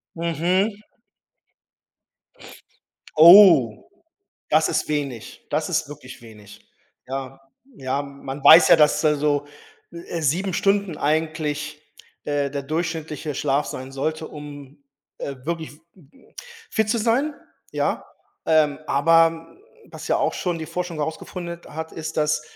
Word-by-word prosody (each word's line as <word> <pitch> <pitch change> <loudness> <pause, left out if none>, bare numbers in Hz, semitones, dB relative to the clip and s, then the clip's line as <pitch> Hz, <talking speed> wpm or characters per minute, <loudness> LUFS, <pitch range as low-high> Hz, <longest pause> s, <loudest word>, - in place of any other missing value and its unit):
Mhm. 175 +6 -1 2.3
Oh, 165 - +7 0.6
das - - +3
ist - - -1
wenig, 140 -6 -5
das - - -1
ist - - -1
wirklich 135 -4 -11
wenig. 105 -2 -15 0.5
Ja. 135 0 -6 0.4
Ja, 135 0 -2
man 140 0 -9
weiß 165 +3 +9
ja, - - +7
dass 150 -2 +3
da 155 -1 +2
so, 145 0 0 0.5
äh, 170 0 -6
7 175 +6 0
Stunden 195 -3 0
eigentlich, 150 -1 -2 0.4
äh, 145 -1 -1
der 140 0 -4
durchschnittliche 155 -1 -4
Schlaf 145 +1 0
sein 130 +1 -7
sollte, 155 +4 -3
um, 145 -1 -11 0.3
äh, 140 - -6
wirklich 165 0 -4 0.3
m 155 -7 -21
m - - -24 0.4
fit 220 -1 0
zu 235 - +1
sein, 245 +7 0 0.4
ja, - - -2 0.4
ähm, 155 -3 +2
aber, 165 +4 +4 0.2
hm, - - -22 0.3
was - - -9
ja - - +2
auch - - 0
schon 175 -2 -3
die 160 - -6
Forschung 180 0 -5
herausgefunden 170 +3 -5
hat, 160 +1 -6
ist, 160 0 -7
dass, 150 0 +1
155 Hz, 130 wpm, -22 LUFS, 140-170 Hz, 2.3 s, weiß